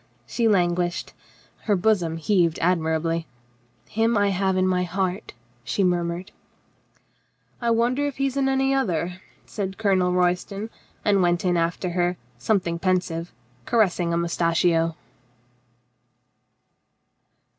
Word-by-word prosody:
She 230 - 0
languished. 175 -3 +1 0.5
Her 210 - +3
bosom 180 -4 +1
heaved 170 -1 +2
admirably. 165 -1 0 0.6
"Him 225 +1 +1
I 205 0 +3
have 190 0 0
in 185 0 +2
my 180 -1 +1
heart," 185 +2 -3 0.3
she 195 - -1
murmured. 175 0 -1 1.3
"I 235 - 0
wonder 245 +5 +2
if 285 - -6
he 275 - +1
is 270 -1 -2
in 270 -1 +1
any 270 0 +2
other," 180 -8 -1 0.2
said 195 -2 -5
Colonel 190 -4 +2
Royston, 180 +4 0 0.3
and 200 -2 +3
went 175 0 +1
in 180 -1 +2
after 170 +2 -1
her, 175 0 0 0.2
something 170 - 0
pensive, 175 -2 -1 0.4
caressing 185 -7 +2
a 170 - +1
moustachio. 165 -1 +1
180 Hz, 120 wpm, -24 LUFS, 170-205 Hz, 1.3 s, Her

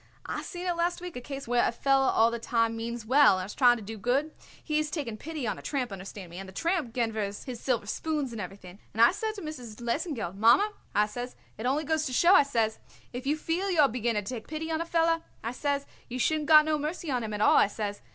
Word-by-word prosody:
"I - - -3
seen 355 0 -7
it 355 - +1
last 345 +1 0
week 355 -1 -7
a 250 - -5
case 275 +1 -7
where 245 0 +3
a - - +2
feller 270 +2 +2
all 225 +1 +4
the 235 - -3
time 230 -1 +1
means 230 0 -5
well 260 -4 +6
and 185 - -3
is 205 - -8
trying 245 -2 +5
to 220 - -9
do 220 +1 -7
good. 270 +8 0 0.3
He 305 -1 0
is 305 0 -1
taking 280 -9 -4
pity 305 +3 -5
on 210 - -2
a - - -10
tramp, 260 -6 -2
understand 190 -1 -8
me, 175 - -8
and 195 0 -8
the - - -13
tramp 330 - -1
ganvers 220 -4 -2
his 250 -3 -6
silver 240 -5 0
spoons 295 +4 -2
and 225 -2 -5
everything, 185 0 -9 0.2
and 225 - +2
I 235 - +7
says 435 +3 -3
to 400 - -7
Mrs. 250 -8 -8
Lesengeld: 240 - -3
'Mommer,' 245 - +5 0.2
I 210 - +4
says, 245 +4 -6 0.2
'it 235 - -2
only 285 +4 +1
goes 315 0 0
to 255 - -5
show,' 345 +8 +5
I - - +8
says, 230 -6 0 0.3
'if 250 +2 -5
you 300 +2 +2
feel 340 +5 -1
you 350 -4 0
are 285 - +6
beginning 230 -3 -1
to 225 - -5
take 225 -3 -7
pity 320 +1 -4
on 320 0 0
a - - -2
feller,' 330 0 +2 0.2
I 230 - -2
says, 280 +2 -1 0.2
'you 250 - -4
shouldn't 305 +3 +1
got 305 -1 +8
no 310 -1 +1
mercy 305 +1 -3
on 250 -2 0
him 215 -1 -4
at 210 - -4
all,' - - +6
I - - +6
says. 205 0 -4
250 Hz, 265 wpm, -28 LUFS, 225-310 Hz, 0.3 s, I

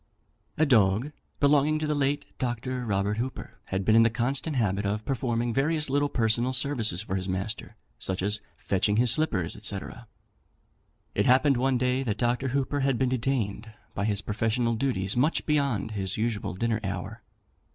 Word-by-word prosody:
A 155 - +4
dog, 110 0 +3 0.3
belonging 145 +1 +4
to 155 - -2
the 150 - 0
late 145 0 0
Dr. 125 0 -2
Robert 100 0 0
Hooper, 130 +3 -5
had 95 0 -3
been 110 - +4
in 115 - +7
the 115 - +5
constant 135 +6 -1
habit 105 -5 +1
of 105 +2 -2
performing 120 -3 -1
various 150 +2 +1
little 145 +1 +2
personal 120 +1 +1
services 120 -9 0
for 95 - -3
his 95 0 -2
master, 95 +4 -4 0.2
such 95 +5 +1
as 105 +1 0 0.2
fetching 100 +2 +1
his 120 0 +4
slippers, 100 - +1
&c. 105 -2 -1 1.3
It 100 - +1
happened 130 +1 +4
one 130 +1 +2
day 125 +1 +1
that 110 -5 -2
Dr. 120 +2 0
Hooper 140 +2 -1
had 135 -2 +1
been 130 0 +1
detained 115 -4 -1 0.2
by 100 - -2
his 105 -2 -1
professional 115 +3 0
duties 110 -6 -1
much 140 +7 +1
beyond 140 -8 0
his 95 -2 -2
usual 110 -4 -2
dinner 115 +2 0
hour. 95 +3 -5
120 Hz, 170 wpm, -27 LUFS, 105-135 Hz, 1.3 s, in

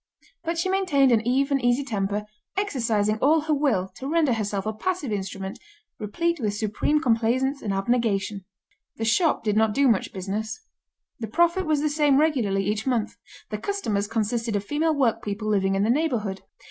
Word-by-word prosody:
But 335 0 -2
she 340 - 0
maintained 365 -9 +3
an 225 -2 +4
even, 275 +2 +2
easy 245 +3 +2
temper, 205 -4 -2 0.3
exercising 225 - 0
all 310 +5 +4
her 310 0 0
will 270 -11 +1
to 265 - -6
render 315 -5 +2
herself 205 -3 -2
a 215 - -1
passive 295 +3 -2
instrument, 195 -1 -4 0.4
replete 335 - -1
with 210 -4 -1
supreme 215 +8 0
complaisance 255 +2 +1
and 205 - -2
abnegation. 200 -1 0 0.5
The 225 - -3
shop 315 +9 +2
did 210 -2 0
not 220 -1 +2
do 280 0 +4
much 225 -6 +1
business. 205 +3 -4 0.6
The 225 - -4
profit 345 - +2
was 305 -2 +2
the 305 - +1
same 295 -2 +3
regularly 230 -11 +1
each 210 +4 -2
month. 240 -5 0 0.4
The 210 - -3
customers 215 - -2
consisted 225 +1 -1
of 200 - -1
female 310 +5 +1
workpeople 220 -5 -1
living 195 -2 +1
in 195 - +1
the 220 - +3
neighbourhood. 235 -10 -1
230 Hz, 170 wpm, -25 LUFS, 210-295 Hz, 0.6 s, an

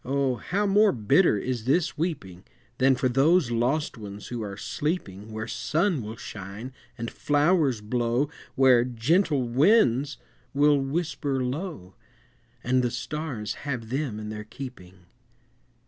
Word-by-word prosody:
how 140 - 0
more 205 +1 +5
bitter 115 - +3
is 120 0 -3
this 155 +6 +1
weeping, 135 - -4 0.4
Than 130 0 +5
for 125 +1 +1
those 135 +3 +3
lost 125 +4 0
ones 105 -1 -8
who 120 -2 -4
are 100 -2 -5
sleeping 110 - -3
Where 110 0 -4
sun 155 - 0
will 110 +1 -6
shine 105 +4 -8 0.2
and 115 -1 -4
flowers 145 - +2
blow, 120 +5 0 0.3
Where 130 -3 +6
gentle 135 - +1
winds 140 - +3 0.4
will 145 0 +5
whisper 140 -2 -1
low, 125 - -5 0.7
And 130 +1 +2
the 125 - +1
stars 130 -3 -4 0.2
have 120 -5 -3
them 130 -4 -2
in 105 0 -6
their 105 0 -5
keeping! 95 -8 -10
130 Hz, 130 wpm, -26 LUFS, 110-150 Hz, 0.7 s, Where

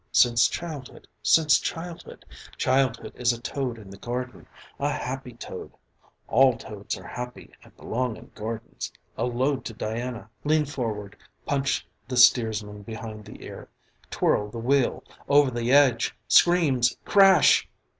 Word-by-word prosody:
Since 120 -1 +5
childhood, 155 -6 -7
since 150 +8 +5
childhood! 165 0 -7 0.3
Childhood 130 -2 +1
is 120 -1 +1
a 115 - -7
toad 125 -1 -3
in 100 -3 -12
the 100 - -12
garden, 125 +1 -5 0.3
a - - 0
happy 130 -1 -4
toad. 120 - -9 0.5
All 130 0 +4
toads 105 -2 -6
are 95 - -12
happy 125 +6 -8
and - - -20
belong 125 0 -2
in - - -15
gardens. 110 +1 -6 0.2
A 120 +2 -1
toad 130 +3 0
to 115 - -5
Diana! 115 +2 -4 0.2
Lean 155 0 +2
forward. 110 -8 -4 0.3
Punch 140 -1 0 0.2
the 125 -1 -3
steersman 110 -4 +4
behind 110 0 -8
the - - -12
ear. - - -10 0.4
Twirl 105 0 +1
the 115 - -8
wheel! 130 +3 +1 0.3
Over 145 -2 +5
the 120 0 -1
edge! 135 -4 +4
Screams! 150 -9 +4
Crash! 195 -5 +5
125 Hz, 140 wpm, -26 LUFS, 115-135 Hz, 0.5 s, Since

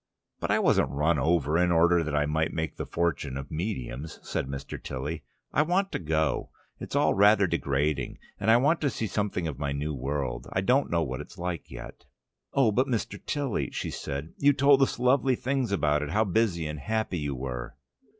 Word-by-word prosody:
"But - - -3
I - - +4
wasn't - - +3
run 75 +2 +1
over 80 +1 +2
in 90 0 +3
order 85 0 +4
that 75 -1 -2
I 75 0 +2
might 80 +2 0
make 80 -4 -3
the - - -5
fortune 75 -6 -1
of 70 0 -7
mediums," 80 - -4
said - - -2
Mr. 70 0 -6
Tilly. 75 +5 -4 0.3
"I - - +4
want 185 +5 +1
to - - -2
go: 80 -3 0 0.3
it's - - -6
all - - +4
rather 100 +1 +5
degrading. 70 -4 -1 0.2
And 105 - 0
I 115 - +7
want 145 +7 +2
to 145 - +2
see 115 - -3
something 100 -4 -1
of 70 -4 -5
my 70 -1 -1
new 75 +2 -2
world. 70 -1 -3
I 95 - 0
don't 130 +8 +2
know 85 -1 +1
what 65 -3 -4
it's - - -12
like 90 -1 -4
yet." - - -10 0.5
"Oh, 130 -5 +3
but, 130 +6 +2
Mr. 120 -5 -3
Tilly," 140 -7 -1
said 70 +4 -5
she. - - -4
"You 145 - +7
told 140 0 +5
us 135 - +2
lovely 130 +1 +3
things 130 -2 -1
about 75 -6 +2
it, 75 - -3
how 105 +7 +2
busy 95 -5 +1
and 75 -1 -4
happy 110 -1 -1
you 70 -2 -2
were." 65 -1 -5
85 Hz, 205 wpm, -28 LUFS, 75-110 Hz, 0.5 s, I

